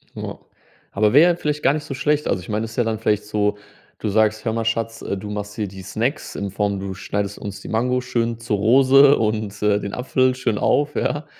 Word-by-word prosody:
Ja. - - -6 0.5
Aber 105 +2 +2
wäre 165 +6 +7
ja - - -1
vielleicht 150 -3 -3
gar 140 - +4
nicht 150 -1 -3
so 135 - -5
schlecht. 150 +2 0
Also 90 - 0
ich - - -12
meine, 105 +1 -1
es 110 - -9
ist - - -12
ja 120 - +3
dann 110 -1 -2
vielleicht 105 -2 0
so 105 -1 0 0.4
du 105 - -2
sagst: 110 +1 +2
„Hör 110 - 0
mal 115 0 -2
Schatz. 115 0 -1
Du 100 +1 -5
machst 105 0 -5
hier 105 -2 -2
die 95 0 -10
Snacks 110 - -3
in 100 -1 -4
Form, 100 0 -1
du 95 -1 -5
schneidest 100 +1 -4
uns 100 -1 -7
die - - -9
Mango 125 +3 +1
schön 120 -2 -2
zur 115 -3 -1
Rose 135 +6 +6
und 105 -2 -2
den 105 -1 +1
Apfel 130 0 +1
schön 115 -4 -1
auf, 145 +1 +1
ja?“ 145 0 -1
110 Hz, 230 wpm, -21 LUFS, 105-125 Hz, 0.5 s, wäre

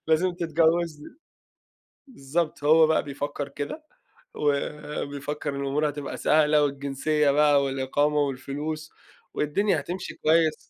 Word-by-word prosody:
لازم 170 +3 +3
تتجوزني." 165 - 0 0.9
بالضبط 155 - -3
هو 160 +1 +6
بقى 160 - +2
بيفكّر 145 0 -5
كده، 145 - -6 0.5
وبيفكّر 145 0 -3
الأمور 140 +2 0
هتبقى 145 -1 -6
سهلة، 150 -1 +3
والجنسية 140 +1 0
بقى 145 0 +4
والإقامة 135 +2 0
والفلوس 145 +3 -3 0.4
والدنيا 195 +8 +1
هتمشي 180 +2 -6
كويس. 160 0 +2
150 Hz, 100 wpm, -26 LUFS, 140-160 Hz, 0.9 s, هو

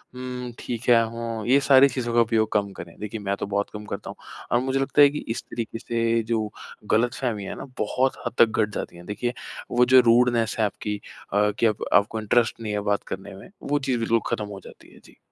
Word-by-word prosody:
हुँ, 125 -1 -5
ठीक 120 0 -5
है, 115 -1 +6
हों, 115 -1 -4
ये 135 +3 +5
सारी 140 0 +6
चीज़ों 120 -2 -3
का 120 - +5
उपयोग 110 -1 +1
कम 100 -1 +1
करें। 85 -2 -10
देखिए, 105 +1 -5
मैं 100 -1 -2
तो - - -2
बहुत 100 0 -1
कम 105 0 -7
करता - - -6
हूँ - - -7 0.4
और 120 - +4
मुझे 135 +1 0
लगता 135 +2 +2
है 145 - +9
कि 150 - -5
इस 115 +2 -3
तरीके 115 -1 -5
से 115 0 0
जो 110 -2 0 0.4
गलतफ़हमी 115 -1 0
है - - -5
ना, - - -7
बहुत 130 +5 0
हद - - -2
तक 115 - +8 0.2
घट 105 - +1
जाती - - -5
है। 85 - -12
देखिए, 120 +4 -3 0.4
वो 125 0 +4
जो 130 +1 +7
रूडनेस 120 -1 +3
है 110 - +4
आपकी 105 0 -4 0.3
अ, 105 +1 +3
कि - - +3
अब 110 -1 0
आपको 105 +2 +3
इंटरेस्ट 115 +2 +1
नहीं 110 -2 -3
है 105 - 0
बात 100 - 0
करने 95 +1 -8
में, 100 - -12
वो 145 +1 0
चीज़ 130 -3 -1
बिल्कुल 115 0 +2
खत्म 105 - -2
हो 100 -1 -8
जाती - - -15
है। - - -17
जी। - - -19
115 Hz, 235 wpm, -24 LUFS, 105-125 Hz, 0.4 s, है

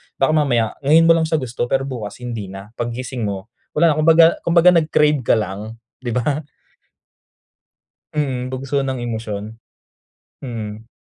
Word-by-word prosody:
baka 135 +3 +2
mamaya 125 -8 +2 0.2
ngayon 160 +3 +6
mo 165 - +6
lang 165 -1 +3
siya 160 - 0
gusto 120 -3 -2
pero 135 +1 +1
bukas 120 -7 -6
hindi 115 -5 -5
na, 95 +3 -10
paggising 120 -1 -3
mo, 100 +2 -6 0.2
wala 165 +1 +4
na, 155 - -1
kumbaga 165 +1 +5
kumbaga 170 +1 +5
nag-crave 150 -3 +3
ka 120 - +2
lang, 105 +1 -4 0.2
di 120 -3 -4
ba? 135 +4 0 1.7
Mm, 130 -4 -2
bugso 135 +2 -1
ng 130 -1 -2
emosyon, 110 -2 -5 0.9
mm. 110 -3 -6
125 Hz, 145 wpm, -20 LUFS, 110-150 Hz, 1.7 s, ngayon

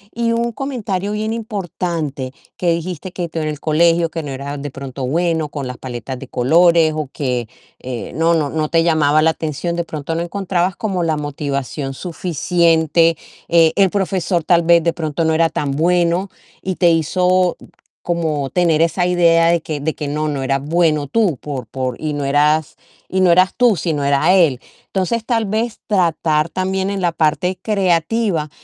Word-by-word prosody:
y 230 0 0
un 235 0 0
comentario 210 -8 -3
bien 215 +1 -2
importante 175 - -4 0.3
que 175 -2 +1
dijiste: 170 +1 -4
"Que 175 -1 -4
tú 165 - -4
en 155 - -2
el 150 -1 -5
colegio, 165 +2 +3
que 165 -1 -5
no 140 - -6
eras 140 +1 -5
de 145 -1 -5
pronto 135 -1 -6
bueno 160 +2 0
con 140 -3 -5
las 125 - -6
paletas 130 +1 -6
de 135 - -9
colores, 165 +4 +4
o 150 -3 -3
que, 125 -5 -2 0.3
eh, 125 -2 -6
no 165 +2 +2
no 155 -4 +1
no 155 -1 -2
te 165 0 +3
llamaba 155 -2 +3
la 160 +1 +4
atención". 160 +2 -3
De 170 - -1
pronto 160 0 -5
no 165 - -1
encontrabas 180 0 -1
como 190 -5 -2
la 160 -2 0
motivación 140 -1 -4
suficiente, 165 -1 +1 0.3
eh, 165 -1 +5
el 195 -1 +4
profesor, 185 -3 -1
tal 175 -1 +4
vez 170 0 +4
de 170 0 +1
pronto 160 -1 -2
no 160 - +2
era 165 0 +3
tan 145 -2 -2
bueno 175 +4 +1 0.3
y 185 -1 -3
te 175 -1 +4
hizo 180 +3 +2 0.4
como 155 -5 -1
tener 165 -3 +2
esa 170 +2 +1
idea 170 -2 +4
de 170 0 +2
que 150 -2 -4
de 160 +1 -1
que 150 - -4
no, 155 +2 -2
no 140 -2 -3
eras 135 +1 0
bueno 155 -3 +1
tú 205 -7 +1
por 135 -5 -6
por 130 +1 -4
y 155 -1 -2
no 145 -1 -3
eras, 150 +2 +2 0.3
y 190 0 0
no 180 -2 +5
eras 185 +2 +4
tú, 240 -3 +4
sino 160 -3 -2
era 140 +6 +3
él. 160 -10 +4 0.3
Entonces, 200 +4 -1
tal 225 -3 0
vez 220 +3 -2
tratar 165 -5 +1
también 190 +2 -1
en 200 -1 -2
la 175 - +1
parte 170 +3 0
creativa, 190 -3 0
165 Hz, 185 wpm, -18 LUFS, 150-180 Hz, 0.4 s, eh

